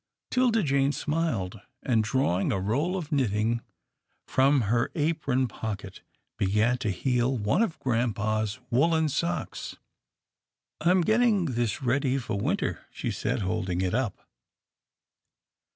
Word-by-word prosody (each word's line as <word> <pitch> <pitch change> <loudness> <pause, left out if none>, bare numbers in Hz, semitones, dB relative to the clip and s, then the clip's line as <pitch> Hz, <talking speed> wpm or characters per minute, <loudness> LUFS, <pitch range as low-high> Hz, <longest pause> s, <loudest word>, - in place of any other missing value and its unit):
'Tilda 245 -4 +3
Jane 140 -1 +2
smiled, 145 - -2 0.2
and, 115 -4 +2
drawing 110 -6 +1
a 95 - 0
roll 140 - 0
of 170 -3 -6
knit 135 -6 +2
ting 110 +3 0 0.7
from 135 +1 +3
her 120 +2 +1
apron 145 -5 +1
pocket, 105 -3 -6 0.4
began 105 +5 +2
to 115 -4 -1
heel 125 +6 +1
one 105 - +1
of 220 -8 0
grampa's 110 -3 0
woolen 160 +5 +3
socks. 170 +4 -3 0.5
" - - -32
I 170 - +3
am 185 0 +5
getting 220 -1 +3
this 120 -3 -1
ready 135 +1 +1
for 120 -4 -3
winter," - - -1
she - - -4
said - - -2
holding 95 -2 -1
it 95 0 0
up. 120 -4 -2
125 Hz, 135 wpm, -27 LUFS, 110-155 Hz, 0.7 s, am